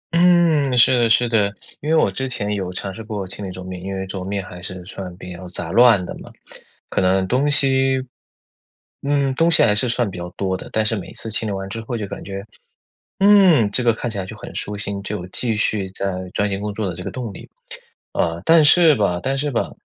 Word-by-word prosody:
嗯， 170 -6 +4
是 120 +1 +6
的 115 -1 +3
是 120 +2 +4
的。 105 -3 +1 0.3
因 150 - -4
为 160 - +4
我 130 -11 +3
之 130 +6 -3
前 105 -4 -3
有 95 -3 -3
尝 95 +1 -5
试 115 - -8
过 105 -3 -4
清 95 +1 -6
理 - - -5
桌 90 0 -8
面， 90 -1 -7
因 95 +1 -5
为 95 0 -3
桌 95 -1 -6
面 100 0 -3
还 90 -1 -10
是 90 0 -7
算 90 -2 -8
比 90 -1 -8
较 90 +1 -9
杂 85 -2 -4
乱 115 -4 +5
的 - - -7
嘛， - - -12 0.6
可 - - -1
能 95 0 +2
东 135 +8 +1
西 135 -2 +2 1.0
嗯， 140 -1 +1
东 165 +5 +3
西 165 - +5
还 105 - +4
是 120 +4 0
算 115 -3 0
比 90 - -8
较 85 0 -5
多 95 -1 -1
的。 - - -8
但 110 0 +1
是 110 - +2
每 95 - -7
次 110 - -6
清 110 0 -1
理 - - -2
完 95 0 -4
之 115 +3 -5
后 115 +1 -4
就 105 - -3
感 - - -7
觉， 100 0 -6 0.8
嗯， 190 - +6
这 125 - +2
个 115 - +4
看 120 +1 -4
起 105 - -4
来 95 - -3
就 110 +3 -9
很 - - -10
舒 105 - -3
心， 100 -1 -4
就 105 +1 -4
有 - - -8
继 115 +3 -2
续 105 -2 0
再 95 0 -3 0.2
钻 105 0 0
研 100 0 -2
工 105 -1 -4
作 110 -2 -2
的 - - -6
这 90 - -7
个 - - -4
动 120 -5 -5
力。 - - -11 0.6
啊， 85 +1 -1
但 165 -1 +6
是 165 0 +6
吧 90 -5 0
但 135 +1 -1
是 145 +1 -1
吧， 120 - -1
105 Hz, 265 characters per minute, -21 LUFS, 95-130 Hz, 1.0 s, 是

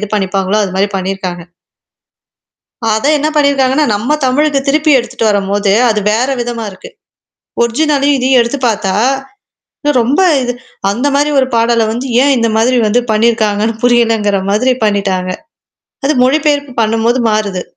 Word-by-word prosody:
இது 210 - -4
பண்ணிப்பாங்களோ 195 0 -1
அது 185 -2 -6
மாரி 195 +2 +1
பண்ணீயிருக்காங்க. 185 -2 -4 1.5
அத 220 - -3
என்னா 300 +1 -1
பண்ணியிருக்காங்கன்னா, 280 0 +2
நம்ம 240 +9 -1
தமிழுக்கு 285 +2 +1
திருப்பி 305 +2 +2
எடுத்துட்டு 235 -2 -3
வரும்போது, 200 0 0 0.2
அது 215 -1 +1
வேற 230 +4 0
விதமா 235 -1 -4
இருக்கு. 190 - -12 0.7
ஒரிஜினலையும் 280 +3 +1
இதையும் 260 0 +2
எடுத்து 235 +5 -3
பாத்தா, 200 -3 -1 1.1
ரொம்ப 265 +9 0 0.2
இது 245 0 -2 0.4
அந்த 240 +8 -2
மாரி 290 +1 +1
ஒரு 260 - 0
பாடல 230 0 +2
வந்து 240 +4 -4 0.2
ஏன் 280 +1 +3
இந்த 230 -1 +1
மாதிரி 240 +3 +2
வந்து 220 +4 +2
பண்ணியிருக்காங்கன்னு 220 -1 +1
புரியலங்கிற 225 -4 +2
மாதிரி 245 +6 +2
பண்ணீட்டாங்க. 195 -3 -1 0.7
அது 285 - +2
மொழிபெயர்ப்பு 285 0 0
பண்ணும்போது 225 +2 +1
மாறுது. 205 -4 -1
230 Hz, 135 wpm, -13 LUFS, 205-265 Hz, 1.5 s, ஏன்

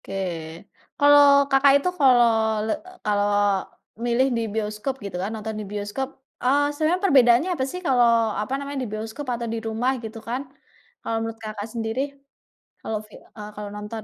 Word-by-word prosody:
Oke. - - -8 0.8
Kalau 285 -1 +6
Kakak 275 0 +5
itu 285 +6 -1
kalau 250 -4 +6 0.4
le 220 - -1 0.3
kalau 205 -1 +1 0.8
milih 240 +2 +2
di - - 0
bioskop, 215 +4 -2
gitu 190 -3 -5
kan, 195 - -2
nonton 220 0 -5
di - - -6
bioskop, 210 +6 -3 0.3
eee, 285 +3 +2
sebenarnya 315 +5 0
perbedaannya 260 -1 +5
apa 265 -6 -1
sih, 360 - -6
kalau, 245 -3 +4 0.3
apa 210 +5 -4
namanya, 280 0 -5
di 240 - -5
bioskop 220 +6 -5
atau 235 0 -3
di 230 - -2
rumah, 225 +4 0
gitu 220 +1 -7
kan. 250 +3 -1 0.6
Kalau 225 - -3
menurut 225 0 -4
Kakak 215 -1 -5
sendiri, 225 +2 -2 0.8
kalau 220 - -3
fi 215 - -22
eee, 210 -1 -11
kalau 210 0 -6
nonton. 210 +1 -6
235 Hz, 165 wpm, -24 LUFS, 215-275 Hz, 0.8 s, Kalau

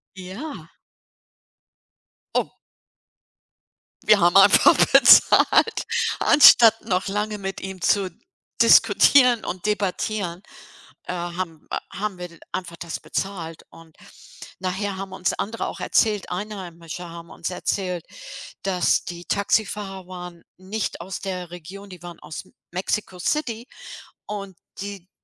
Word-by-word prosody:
Ja. 195 +12 -8 1.6
Oh. - - 0 1.5
Wir 210 - +5
haben 175 +2 +3
einfach 195 - +7 0.2
bezahlt. 455 - +6 0.4
Anstatt 230 -6 +7
noch 185 +1 0
lange 210 +1 -2
mit 195 -1 -5
ihm 190 -2 -8
zu 195 -3 +2 0.5
diskutieren 250 -5 +5
und 185 +3 -5
debattieren, 200 -2 -2 0.6
äh, - - -4
haben, 175 -2 -5
äh - - -1 0.2
haben 205 -2 -3
wir 175 -1 -9
einfach 170 -2 -5
das 170 -1 -6
bezahlt 170 -5 -5
und 165 -1 -17 0.6
nachher 190 +2 -3
haben 195 0 -7
uns 185 -1 -1
andere 225 +3 -4
auch - - -7
erzählt 210 -3 +1
Einheimische 180 -3 -7
haben 170 0 -11
uns 170 - -5
erzählt, 180 -1 -3 0.6
dass 185 -2 +1
die 175 0 -8
Taxifahrer 200 -2 -1
waren 180 -2 -9
nicht 190 0 -4
aus 190 +2 -6
der 180 -3 -6
Region, 185 +4 -10
die 180 -3 -12
waren 175 -1 -10
aus 150 +1 -8
M - - -24 0.2
Mexiko 185 0 -3
City 240 - -2 0.6
und 200 -3 -7 0.2
die 200 -2 -8
190 Hz, 120 wpm, -23 LUFS, 175-205 Hz, 1.6 s, einfach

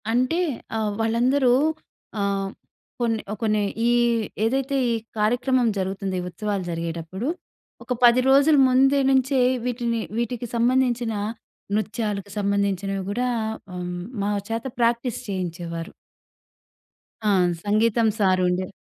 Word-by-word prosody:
అంటే 255 +8 +1 0.4
ఆహ్, 215 -1 0
వాళ్ళందరూ 245 +3 +3 0.7
ఆహ్, 195 -1 0 0.5
కొన్ని, 225 -2 +1 0.2
కొన్ని 215 -2 +2 0.3
ఈ - - +4 0.6
ఏదైతే 270 +4 0 0.2
ఈ - - +2 0.3
కార్యక్రమం 245 +3 +2
జరుగుతుంది 190 0 -2
ఈ - - -6
ఉత్సవాలు 205 +1 -3
జరిగేటప్పుడు 165 +6 -4 0.6
ఒక 250 - -2
10 240 +1 +7
రోజుల 285 +3 +6
ముందు 270 +2 +4
నుంచే 265 0 +2 0.3
వీటిని 235 -2 -1 0.2
వీటికి 240 0 -2
సంబంధించిన 240 -1 +2 0.6
నృత్యాలకు 210 -2 -2
సంబంధించినవి 200 -1 0
కూడా 245 +4 0 0.5
హ్మ్. 180 0 -4 0.2
మా 200 - 0 0.2
చేత 225 +2 -3
ప్రాక్టీస్ 235 0 +1
చేయించేవారు. 175 -2 -4 1.4
ఆ! - - +4 0.3
సంగీతం 225 +2 +3
సార్ 185 -2 +3
ఉండే 180 +1 0
225 Hz, 110 wpm, -24 LUFS, 195-245 Hz, 1.4 s, 10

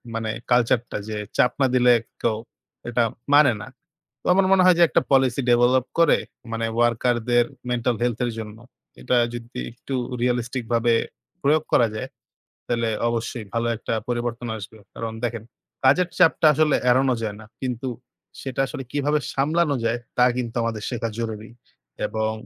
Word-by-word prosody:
মানে 110 -1 -2 0.2
culture 120 -1 +4
টা - - -2
যে 105 - -3 0.2
চাপ 125 - +4
না 135 - +5
দিলে 125 -1 +5 0.3
কেউ 110 -2 +1 0.5
এটা 120 0 +2 0.3
মানে 145 -3 +7
না। - - -8 0.5
তো - - -35
আমার 190 +1 +3
মনে 190 -1 +6
হয় 185 - +6
যে - - +8
একটা - - +3
policy 135 -1 +3
develop 125 +1 +4
করে 165 - +5 0.3
মানে 115 0 -1
worker 120 +1 +2
দের 120 0 +4 0.3
mental 120 0 0
health 120 -2 0
এর 120 - -2
জন্য। 110 0 -7 0.4
এটা 125 - +1 0.2
যদি 120 +1 -7
একটু 130 +3 -8 0.3
realistic 125 0 -1
ভাবে 115 0 +3 0.5
প্রয়োগ 150 +2 +3
করা 120 - +5
যায়, 130 +4 -4 0.6
তাইলে 115 -1 0 0.2
অবশ্যই 115 0 -3
ভালো 115 0 0
একটা 115 - -3
পরিবর্তন 120 0 -2
আসবে। 110 +1 -10 0.2
কারণ 115 -1 -4
দেখেন, 115 -2 -3 0.4
কাজের 170 +7 +4
চাপটা 160 -1 +5
আসলে 155 0 +3
এড়ানো 130 +1 +3
যায় 105 -2 -3
না। - - -12 0.2
কিন্তু 125 0 -3 0.5
সেটা 135 -1 -4
আসলে 135 - -6
কিভাবে 145 +1 +1
সামলানো 150 +2 +1
যায় 115 +1 +1 0.2
তা 125 - +6
কিন্তু 120 -2 -4
আমাদের 110 -2 -2
শেখা 115 -2 -2
জরুরি। 110 -1 -4 0.6
এবং 110 0 -1
120 Hz, 165 wpm, -23 LUFS, 115-135 Hz, 0.6 s, যে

